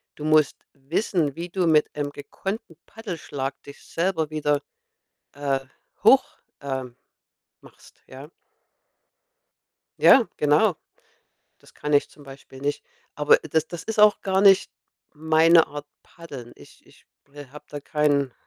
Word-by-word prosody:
du 150 - -8
musst 155 -2 +3 0.2
wissen, 150 +1 -2
wie 170 +1 -5
du 180 -1 -1
mit 155 -2 +2
einem 145 -1 -3
gekonnten 190 +7 -7
Paddelschlag 165 - -6
dich 140 - -13
selber 165 -3 -1
wieder, 150 -2 -1 0.7
äh, 140 -1 -1 0.4
hoch - - +6 0.4
ähm, 130 -3 -5 0.7
machst, - - -20
ja? 135 +3 -11 1.7
Ja, 255 -4 +6
genau. 150 +6 +3 0.8
Das - - -21
kann 150 0 -5
ich 145 - +2
zum 150 - -18
Beispiel 135 -1 -13
nicht. 145 +1 -3 0.3
Aber 150 0 +4
das 160 0 -1
das 170 -1 -8
ist 220 -1 -5
auch 210 0 +5
gar 190 0 0
nicht 195 -2 +5 0.4
meine 160 +2 +4
Art 145 0 -9 0.2
Paddeln. 140 -8 -11
Ich - - -18
ich - - -23 0.4
habe 150 +2 -13
da 145 - -7
keinen 145 -3 0
150 Hz, 130 wpm, -24 LUFS, 145-170 Hz, 1.7 s, hoch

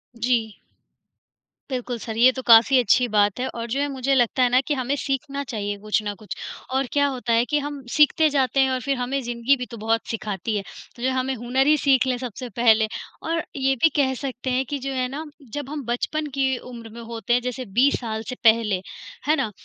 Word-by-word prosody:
जी। 230 -2 -1 1.1
बिल्कुल 250 -2 -3
सर 225 0 -6
ये 250 +2 +7
तो - - -2
काफ़ी 235 +3 +7
अच्छी 245 +2 +3
बात 205 0 +2
है 260 - -1
और 230 0 -4
जो 270 +4 -1
है 290 - +1
मुझे 270 0 -1
लगता 250 +1 +2
है 245 - +4
ना 250 - +4
कि 300 - +1
हमें 265 0 -1
सीखना 280 0 -2
चाहिए 205 -5 -4
कुछ 215 +1 0
ना 205 0 -3
कुछ। 210 +2 -8 0.4
और 265 -1 +1
क्या 285 -1 +3
होता 250 -4 -2
है 230 +1 +3
कि 295 - +2
हम 290 -1 -5
सीखते 310 +1 +4
जाते 275 -1 +1
हैं 265 -1 +4
और 255 - 0
फिर 275 +1 -1
हमें 255 +3 -2
ज़िंदगी 240 +3 +1
भी 250 - -4
तो 235 - -7
बहुत 225 +1 0
सिखाती 215 -1 -3
है, 195 - -3 0.3
तो 240 - -12
जो 260 - +2
हमें 260 +1 -1
हुनर 250 +4 0
ही 305 - +5
सीख 265 -3 +3
लें 250 -1 0
सबसे 250 0 -6
पहले। 220 -2 +4 0.4
और 330 0 -1
ये 270 -1 +1
भी 325 - +7
कह 270 -3 +2
सकते 260 -2 -4
हैं 260 +1 +1
कि 285 -1 -2
जो 275 +1 -4
है 255 -1 0
ना, 285 +4 -5 0.3
जब 290 -2 -4
हम 295 -2 -5
बचपन 300 +6 -2
की 265 -2 +1
उम्र 235 -2 -10
में 235 +2 -10
होते 230 +1 -3
हैं, 245 - +3
जैसे 250 +1 -4
20 245 +7 +2
साल 220 -2 -4
से 255 - -4
पहले, 220 -4 +4 0.5
है 305 - +4
ना? 270 -8 -1
250 Hz, 230 wpm, -23 LUFS, 230-275 Hz, 1.1 s, ये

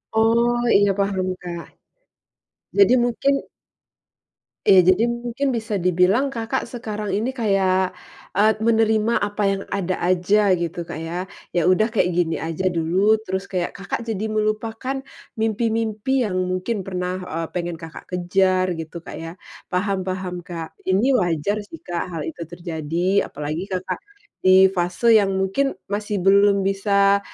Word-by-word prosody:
Oh 235 +2 +3 0.2
iya 205 0 +3
paham 195 -2 0
Kak. 170 -1 -6 1.1
Jadi 400 -9 +6
mungkin 245 +3 +1 1.4
Iya, 190 - +8
jadi 185 +4 +4
mungkin 240 +3 -3
bisa 225 -3 -2
dibilang 185 +8 +2
Kakak 235 +2 -2
sekarang 215 -4 -4
ini 220 +5 0
kayak, 190 -5 +2 0.5
eee, 215 +2 +4
menerima 225 0 +3
apa 205 +1 -3
yang 195 0 -2
ada 185 -2 -2
aja 185 +2 +3
gitu 170 0 -4
Kak - - -6
ya, 180 +3 -4 0.3
ya 175 -1 +2
udah 215 +4 +2
kayak 200 -6 +2
gini 170 -2 +1
aja 165 +3 -1
dulu 185 +6 +2
terus 190 +1 -2
kayak 180 -2 -2
Kakak 195 +4 -5
jadi 215 -2 -2
melupakan 225 +5 -2 0.3
mimpi-mimpi 225 +3 0
yang 185 -5 -1
mungkin 185 +5 -2
pernah, 180 -1 -2 0.2
eee, 165 0 -2
pengen 175 -1 -3
Kakak 165 0 -10
kejar 185 +1 +1
gitu 165 +1 -7
Kak - - -8
ya. 165 0 -6 0.4
Paham 195 +1 -1
paham 185 -1 -3
Kak, 165 -2 -7
ini 200 +8 +3
wajar 175 +3 0
jika 205 - -9
sih 330 - -10
Kak 175 -1 -3
hal 165 -2 -4
itu 170 - -12
terjadi 170 +2 -1
apalagi 155 +6 -4
Kakak 185 -2 -3 0.4
di 190 0 +6
fase 180 +4 -1
yang 195 -2 0
mungkin 270 +9 0 0.2
masih 205 -2 -2
belum 200 0 +5
bisa, 200 0 +3
195 Hz, 145 wpm, -22 LUFS, 180-220 Hz, 1.4 s, Iya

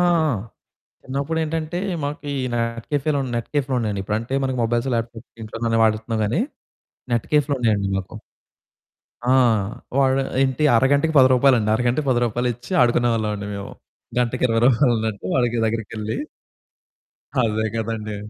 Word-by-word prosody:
ఆ! 155 -4 +2 0.7
చిన్నప్పుడేంటంటే, 160 +4 -2 0.2
మాకు 145 +1 -3
ఈ - - -2 0.2
నెట్ 115 0 -2
కేఫేలు, 145 0 +1 0.2
నెట్ 115 - -3
కేఫ్‌లుండేయండి. 125 -8 0
ఇప్పుడంటే 110 +5 -3
మనకి 130 -1 -1
మొబైల్స్, 120 +3 0
ల్యాప్టాప్స్ 115 0 -5
ఇంట్లోనే 115 +2 -5
గానీ 115 0 +2
వాడేత్తన్నాం 110 +1 0
గానీ, 120 - 0 0.7
నెట్ 115 - 0
కేఫులుండేయండి 125 -9 +2
మాకు. 95 - -6 1.1
ఆ! - - +6 0.6
వాడు 135 0 +3 0.2
ఏంటి, 135 +2 +1
అరగంటకి 140 +6 +3
10 130 - +8
రూపాయలండి. 125 -4 +4
అరగంటకి 125 +5 0
10 120 - +3
రూపాయలిచ్చి 120 +1 -3
ఆడుకునేవాళ్ళవండి 115 -4 +1
మేము. 100 0 -7 0.5
గంటకి 125 +1 0
20 115 -1 +1
రూపాయలన్నట్టు 115 -6 +2
వాడికి 120 -2 +1
దగ్గరకెళ్ళి 110 -1 -3 1.2
అదే 110 -1 0
కదండి! 110 -1 -3
120 Hz, 120 wpm, -22 LUFS, 110-135 Hz, 1.2 s, 10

